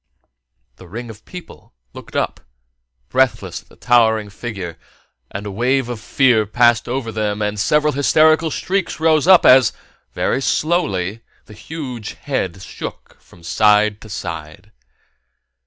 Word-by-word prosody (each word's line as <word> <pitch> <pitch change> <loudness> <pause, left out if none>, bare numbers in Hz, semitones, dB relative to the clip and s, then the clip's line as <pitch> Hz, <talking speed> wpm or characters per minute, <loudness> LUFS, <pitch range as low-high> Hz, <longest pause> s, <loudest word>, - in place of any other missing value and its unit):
The 95 - -14
ring 115 +5 -7
of 110 0 -16
people 180 - -12 0.2
looked - - -12
up - - -1 0.7
breathless 130 -1 0
at - - -30
the - - -18
towering 110 -4 +2
figure, 95 -7 -7 0.5
and 100 +2 -6
a 100 - -5
wave 125 +4 0
of 120 -3 -5
fear 120 -2 +2
passed 120 +1 +3
over 125 -2 -3
them 105 -1 -2
and 105 0 -2
several 150 +8 +2
hysterical 155 +3 +3
shrieks 190 +3 -2
rose 160 0 +3
up 190 -2 +7
as, 130 -3 +6 0.4
very 135 - -1
slowly, 115 - 0 0.2
the 105 - -14
huge 125 -3 -7
head 95 -10 -3
shook - - -9
from 85 - -20
side 105 +3 +3
to 110 - -12
side. 85 0 -7
115 Hz, 140 wpm, -19 LUFS, 105-135 Hz, 0.7 s, up